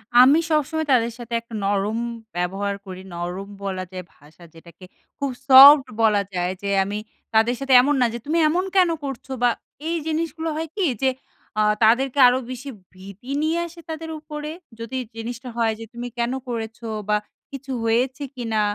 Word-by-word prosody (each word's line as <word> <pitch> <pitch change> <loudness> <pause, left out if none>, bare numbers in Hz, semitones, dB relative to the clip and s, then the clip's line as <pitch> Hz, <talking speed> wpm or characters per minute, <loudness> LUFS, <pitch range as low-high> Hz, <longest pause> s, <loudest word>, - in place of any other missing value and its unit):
আমি 260 +6 +8
সবসময় 310 +1 +1
তাদের 235 -2 +3
সাথে 235 0 -8
একটা 230 0 -16
নরম 205 +2 0 0.4
ব্যবহার 195 +3 -2
করি। 185 -1 -8
নরম 175 +3 -5 0.2
বলা 190 -2 -3
যায় 185 -1 -6
ভাষা 155 +4 -19
যেটাকে 170 +2 -15 0.3
খুব 280 -2 -1 0.2
সফট 275 +1 +10 0.2
বলা 210 -2 +4
যায়, 180 0 -1
যে 200 - -2
আমি 205 +2 -4 0.4
তাদের 225 +3 +3
সাথে 275 -1 +1
এমন 290 +3 +2
না - - +5
যে, 235 - -4
"তুমি 310 +3 0
এমন 360 +4 0
কেন 365 -2 +5
করছো?" 270 -1 -6
বা 245 - +6 0.4
এই 335 - 0
জিনিসগুলো 320 0 -2
হয় 320 +1 -3
কি, 400 -3 +1 0.2
যে 265 - +4 0.5
আ - - +4 0.2
তাদেরকে 255 +5 +3
আরো 250 +1 +3
বেশি 255 +2 -7 0.2
ভীতি 200 +7 -11
নিয়ে 320 +2 +1
আসে 340 +1 -14
তাদের 320 0 -5
উপরে। 300 0 -6 0.3
যদি 230 +3 -5 0.2
জিনিসটা 235 +2 -6
হয় 225 -1 +2
যে 225 - -7
তুমি 240 +1 -5
কেন 235 +1 0 0.2
করেছো? 230 -1 -5 0.2
বা 210 - +4 0.3
কিছু 275 0 -7
হয়েছে 250 +5 0
কিনা? 225 -4 -1
240 Hz, 175 wpm, -23 LUFS, 205-285 Hz, 0.5 s, সফট